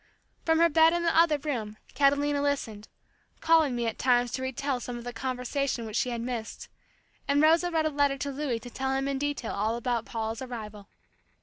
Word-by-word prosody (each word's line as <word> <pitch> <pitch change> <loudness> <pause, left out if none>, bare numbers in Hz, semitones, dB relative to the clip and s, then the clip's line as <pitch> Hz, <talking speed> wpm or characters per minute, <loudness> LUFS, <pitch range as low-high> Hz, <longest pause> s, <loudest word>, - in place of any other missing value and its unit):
From 325 -1 +3
her 335 +1 +6
bed 325 +1 +5
in 345 0 0
the 335 - +1
other 325 -2 +5
room, 235 -8 -4 0.2
Catalina 285 0 +2
listened, 230 -7 -2 0.5
calling 320 -5 +3
me 240 -1 -1
at 225 - -3
times 245 -1 +2
to 260 - -3
re 260 0 -2
tell 270 0 -2
some 245 0 -6
of 240 - -8
the 245 0 -6
conversation 255 +1 -2
which 215 -1 -7
she 250 - +1
had 235 -1 -3
missed, 235 -2 -5 0.6
and 280 0 +3
Rosa 330 +3 +4
wrote 320 -2 0
a - - +2
letter 285 -2 +1
to 280 +1 -3
Louis 275 -3 -2
to 245 +1 -10
tell 265 +1 -2
him 270 0 -1
in 275 -1 -1
detail 290 -5 -2
all 215 +3 0
about 235 -1 -2
Paula's 225 0 -4
arrival. 215 -5 -8
265 Hz, 210 wpm, -28 LUFS, 235-290 Hz, 0.6 s, her